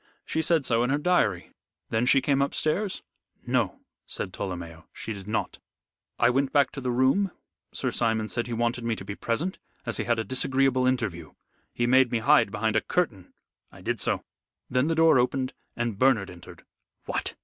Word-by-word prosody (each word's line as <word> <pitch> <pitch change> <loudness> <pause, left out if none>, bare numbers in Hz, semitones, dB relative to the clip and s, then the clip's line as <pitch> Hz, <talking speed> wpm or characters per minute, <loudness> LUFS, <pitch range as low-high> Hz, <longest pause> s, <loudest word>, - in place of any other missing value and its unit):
She 160 - -1
said 160 -3 +2
so 115 -1 +2
in 120 - +1
her 145 - +2
diary. 180 +4 +1 0.4
Then 115 +2 +1
she 135 - +5
came 140 0 +2
upstairs?" 155 +8 -1 0.4
"No," - - 0 0.3
said 90 - -3
Tolomeo, 85 -4 -6
"she 110 - -6
did 100 -1 -10
not. 110 - -2 0.6
I - - +4
went 135 +2 +1
back 140 -3 +3
to 135 - -7
the 125 - -2
room. 130 +11 +3 0.4
Sir - - -1
Simon 110 -2 0
said 120 +2 -2
he 120 - -4
wanted 120 +1 -1
me 115 -1 0
to 95 - -9
be 100 - -4
present, 145 - -2 0.3
as 115 - 0
he - - -2
had 120 -1 +2
a 115 - 0
disagreeable 130 +2 +1
interview. 100 - -2 0.4
He 120 - -1
made 130 0 +4
me 120 - +2
hide 140 +2 +4
behind 110 +2 -1
a 110 - +4
curtain. 115 - -1 0.4
I - - -14
did - - -2
so. - - 0 0.5
Then 125 +3 +2
the 165 - +1
door 160 -4 +5
opened 130 +1 0 0.2
and 120 -4 -2
Bernard 125 -8 +3
entered." 85 -1 -13 0.4
"What!" - - -3
125 Hz, 190 wpm, -27 LUFS, 110-135 Hz, 0.6 s, she